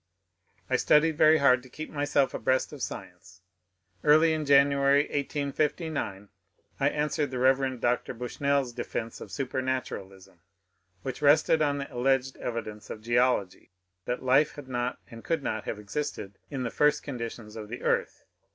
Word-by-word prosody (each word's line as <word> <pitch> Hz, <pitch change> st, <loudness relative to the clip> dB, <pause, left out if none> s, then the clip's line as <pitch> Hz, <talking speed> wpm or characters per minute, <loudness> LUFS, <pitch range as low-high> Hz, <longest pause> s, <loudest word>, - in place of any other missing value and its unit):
I -, -, +2 dB
studied 160 Hz, +1 st, +4 dB
very 155 Hz, +1 st, +6 dB
hard 130 Hz, -3 st, +4 dB
to 130 Hz, -, -15 dB
keep 155 Hz, +5 st, -8 dB
myself 145 Hz, -2 st, +1 dB
abreast 130 Hz, 0 st, 0 dB
of -, -, -9 dB
science* 90 Hz, 0 st, -8 dB, 0.6 s
Early 155 Hz, +2 st, +5 dB
in 155 Hz, -2 st, -2 dB
January, 140 Hz, 0 st, +5 dB
1859, 145 Hz, -, -2 dB, 0.5 s
1 140 Hz, 0 st, +3 dB
answered 150 Hz, -1 st, -1 dB
the 130 Hz, -, -5 dB
Rev. 130 Hz, 0 st, +2 dB
Dr. 120 Hz, +1 st, 0 dB
Bushnell's 130 Hz, +2 st, -1 dB
defence 115 Hz, -1 st, -5 dB
of -, -, -8 dB
supematuralism, 130 Hz, -9 st, -4 dB, 0.6 s
which 130 Hz, +1 st, -5 dB
rested 155 Hz, +2 st, +4 dB
on 145 Hz, -1 st, +2 dB
the 140 Hz, 0 st, -6 dB
alleged 130 Hz, +1 st, +1 dB
evidence 110 Hz, -3 st, -5 dB
of 110 Hz, -, -7 dB
geology 120 Hz, -5 st, +1 dB, 0.4 s
that 125 Hz, +1 st, -3 dB
life 135 Hz, +4 st, +3 dB
had 145 Hz, -3 st, -10 dB
not 125 Hz, -1 st, -2 dB
and 115 Hz, 0 st, -10 dB
could 165 Hz, -4 st, -1 dB
not 110 Hz, -1 st, -3 dB
have -, -, -3 dB
existed 105 Hz, -2 st, -5 dB
in 135 Hz, -3 st, -4 dB
the 120 Hz, -, -3 dB
first 150 Hz, 0 st, +2 dB
conditions 115 Hz, -4 st, -6 dB
of 105 Hz, -2 st, -7 dB
the 120 Hz, -, -7 dB
earth. -, -, 0 dB
130 Hz, 150 wpm, -28 LUFS, 120-145 Hz, 0.6 s, very